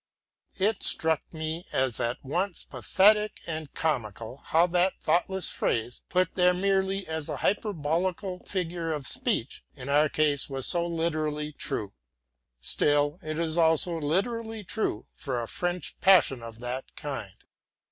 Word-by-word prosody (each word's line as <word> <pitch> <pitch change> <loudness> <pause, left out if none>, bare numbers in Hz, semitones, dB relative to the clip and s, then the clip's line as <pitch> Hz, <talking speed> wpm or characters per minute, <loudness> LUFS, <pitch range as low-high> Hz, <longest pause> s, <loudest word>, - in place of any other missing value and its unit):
It 200 +2 +1
struck 160 -2 +2
me 160 +1 -4
as 130 -3 0
at 120 +1 -1
once 175 +6 -1
pathetic 210 +2 +3
and 155 -3 -4
comical, 115 -6 -2
how 165 +4 +3
that 180 +1 +1
thoughtless 190 +1 +1
phrase, 115 +1 -1
put 185 0 +1
there 180 -1 +4
merely 195 0 +1
as 160 -2 -4
a - - -3
hyperbolical 185 -1 -1
figure 170 -3 -2
of 145 -3 -4
speech, 120 +1 +1
in 135 -1 -7
our 150 +2 +4
case 150 -2 +1
was 135 -1 -3
so 170 -1 +1
literally 155 -3 -1
true. 105 -7 -2 0.7
Still 145 - +1
it 155 -2 -4
is 165 0 0
also 160 +1 +3
literally 220 +8 -1
true 195 - -2
for 130 -4 -3
a 115 - -4
French 175 +5 -2
passion 180 -10 +5
of 115 -1 -9
that 125 +2 -5
kind. 135 -10 -6
160 Hz, 140 wpm, -28 LUFS, 145-185 Hz, 0.7 s, passion